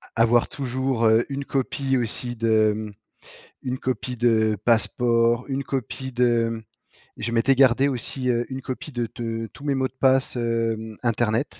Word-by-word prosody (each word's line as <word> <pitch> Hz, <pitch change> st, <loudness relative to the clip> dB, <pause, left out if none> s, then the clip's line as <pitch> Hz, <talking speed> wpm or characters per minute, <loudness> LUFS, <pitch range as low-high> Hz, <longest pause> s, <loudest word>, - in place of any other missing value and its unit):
A 115 Hz, -, +2 dB
avoir 120 Hz, +1 st, +4 dB
toujours, 130 Hz, -3 st, -1 dB
heu, 110 Hz, +1 st, +4 dB
une 140 Hz, 0 st, -4 dB
copie 135 Hz, 0 st, -1 dB
aussi 120 Hz, +1 st, -3 dB
de 110 Hz, -2 st, +3 dB
mmh 110 Hz, -1 st, -5 dB, 0.7 s
une 130 Hz, 0 st, -3 dB
copie 125 Hz, 0 st, -3 dB
de 110 Hz, -3 st, +2 dB
passeport, 120 Hz, 0 st, +2 dB
une 135 Hz, 0 st, -2 dB
copie 130 Hz, 0 st, -4 dB
de 115 Hz, -2 st, +1 dB, 0.5 s
je 115 Hz, -, -3 dB
m'étais 120 Hz, +4 st, +3 dB
gardé 135 Hz, +1 st, +5 dB
aussi, 125 Hz, 0 st, -2 dB
heu, 120 Hz, 0 st, +1 dB
une 130 Hz, 0 st, -4 dB
copie 130 Hz, +4 st, -6 dB
de 120 Hz, -2 st, -2 dB
de 115 Hz, -2 st, -4 dB
tous 145 Hz, -, -13 dB
mes 140 Hz, -2 st, 0 dB
mots 130 Hz, 0 st, +1 dB
de -, -, -25 dB
passe, 130 Hz, -1 st, +3 dB
hem, 115 Hz, -2 st, -2 dB
internet. 115 Hz, +2 st, 0 dB
120 Hz, 165 wpm, -24 LUFS, 115-130 Hz, 0.7 s, gardé